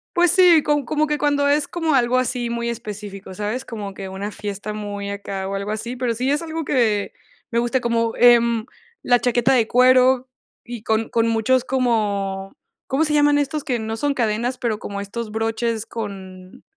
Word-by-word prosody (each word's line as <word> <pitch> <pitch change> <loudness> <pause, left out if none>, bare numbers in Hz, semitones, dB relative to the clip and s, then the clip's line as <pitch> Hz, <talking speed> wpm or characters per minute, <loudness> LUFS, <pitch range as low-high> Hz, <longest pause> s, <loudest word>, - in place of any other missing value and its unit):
Pues 350 -1 +4
sí, 355 -4 +6
com 295 -2 +1
como 305 +4 0
que 300 0 0
cuando 285 -1 +1
es 285 0 +2
como 325 -3 -1
algo 250 -1 +3
así 250 -1 -1
muy 235 0 -2
específico, 205 -4 -7
¿sabes? 210 +6 -3
Como 210 -6 -7
que 195 0 -7
una 195 +2 -5
fiesta 210 0 -5
muy 205 -1 -5
acá 195 -1 -5
o 195 - -3
algo 200 +1 -3
así, 220 +3 -4
pero 245 -2 -1
sí 255 +4 -1
es 295 +2 +1
algo 325 -1 -4
que 220 -7 +1 0.4
me 235 - +1
gusta, 240 +2 +1
como, 230 -1 0
em, 235 -2 +5 0.4
la 245 0 +4
chaqueta 245 +2 +2
de 235 -4 +3
cuero 255 +1 +4 0.4
y 235 -3 -8
con 220 0 0
con 230 0 +1
muchos 230 +3 +2
como 205 -7 -1 0.3
¿cómo 275 +4 +1
se 300 - -1
llaman 290 -1 +4
estos 290 +1 -1
que 250 -3 -1
no 220 0 -4
son 290 +3 0
cadenas, 235 +1 -1
pero 225 -3 -2
como 200 0 -6
estos 215 +2 -5
broches? 225 0 -1
con 190 -5 -8
235 Hz, 190 wpm, -21 LUFS, 210-260 Hz, 0.4 s, sí